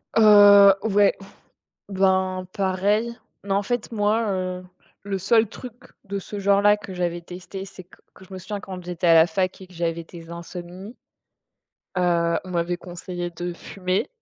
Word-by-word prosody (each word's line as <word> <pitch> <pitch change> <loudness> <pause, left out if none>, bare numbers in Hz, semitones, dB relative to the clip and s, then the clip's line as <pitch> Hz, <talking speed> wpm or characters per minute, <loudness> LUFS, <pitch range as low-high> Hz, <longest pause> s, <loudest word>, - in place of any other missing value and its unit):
Heu, 205 -2 +8
ouais. 205 -2 +3 0.7
Ben 190 -1 +1
pareil. 200 +4 0 0.3
Mais 200 - -3
en 200 +1 +2
fait, 240 +3 -3
moi, 215 +1 +1
heu, 185 -1 -3 0.4
le 195 -1 -3
seul 220 +3 +3
truc 250 +3 -9 0.3
de 200 0 -4
ce 205 +2 -7
genre 200 0 +3
là 205 0 +5
que 200 -2 -10
j'avais 175 -1 -2
testé, 180 +2 -9
c'est 195 -1 -12
q 180 - -21 0.2
que 190 - -15
je 190 - -17
me 190 - -6
souviens 200 +2 -6
quand 185 -3 -8
j'étais 180 0 -3
à 165 - +6
la 160 0 +7
fac 185 +3 -2
et 190 - -10
que 180 - -19
j'avais 170 0 -2
des 165 0 -12
insomnies, 175 +5 -9 1.0
heu, 170 -2 +1
on 185 - -9
m'avait 175 0 -1
conseillé 175 0 -6
de 175 +1 -5
fumer 185 +2 -3
185 Hz, 175 wpm, -23 LUFS, 175-200 Hz, 1.0 s, Heu